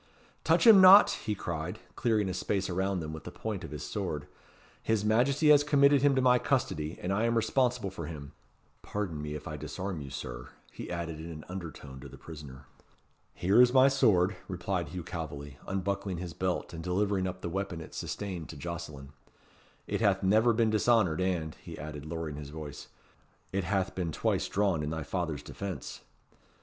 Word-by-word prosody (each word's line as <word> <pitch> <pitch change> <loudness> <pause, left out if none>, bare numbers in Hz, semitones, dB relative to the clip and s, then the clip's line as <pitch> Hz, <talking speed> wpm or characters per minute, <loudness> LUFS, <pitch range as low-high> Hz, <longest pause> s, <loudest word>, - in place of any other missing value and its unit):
"Touch - - +3
him 215 -4 +10
not!" 190 +2 +9
he 105 - -3
cried, 85 -2 -4 0.2
clearing 110 -4 +1
a 95 - -2
space 95 0 -1
around 95 0 0
them 80 0 -5
with 80 - -8
the - - -7
point - - -5
of - - -6
his - - -6
sword. 75 -1 -3 0.6
"His 110 -2 0
Majesty 135 +8 +3
has 145 -1 +7
committed 140 -1 +5
him 140 -1 +4
to 130 - +2
my 125 -1 +5
custody, 80 - -1
and 90 +2 -2
I 105 +4 +1
am 115 0 +1
responsible 120 -2 +1
for 85 -5 -6
him. 70 -4 -8 0.5
Pardon 95 -8 -4
me 75 0 -4
if 75 - -7
I 75 - -5
disarm 80 +4 -5
you, 70 - -7
Sir," - - -7 0.2
he - - -8
added 85 -2 -4
in 80 +1 -7
an 75 -2 -8
undertone 80 -7 -8
to 70 +1 -10
the - - -12
prisoner. 70 -5 -10 0.7
"Here 100 +7 +4
is 125 0 +5
my 130 0 +7
sword," 105 -9 +3
replied 90 -1 -2
Hugh 90 -1 -6
Calveley, 75 -5 -6
unbuckling 95 0 -2
his 85 -1 -6
belt 90 +1 -2
and 80 -1 -6
delivering 95 +1 0
up 90 0 -6
the - - -3
weapon 95 -1 -3
it 80 - -10
sustained 95 -6 -5
to - - -8
Jocelyn; 75 -3 -6 0.8
"it - - -2
hath 100 -3 +2
never 110 +5 +4
been 115 -1 +2
dishonoured, 110 -6 +3
and," 85 -4 -1
he - - -9
added, 75 -1 -7
lowering 80 -2 -4
his 75 -2 -7
voice, 75 -1 -8 0.6
"it 95 -2 -1
hath 95 0 0
been 90 -3 -2
twice - - 0
drawn 95 -5 +1
in 75 - -2
thy 80 0 -3
father's 80 -1 -3
defence." 100 -2 -6
90 Hz, 190 wpm, -30 LUFS, 80-105 Hz, 0.8 s, him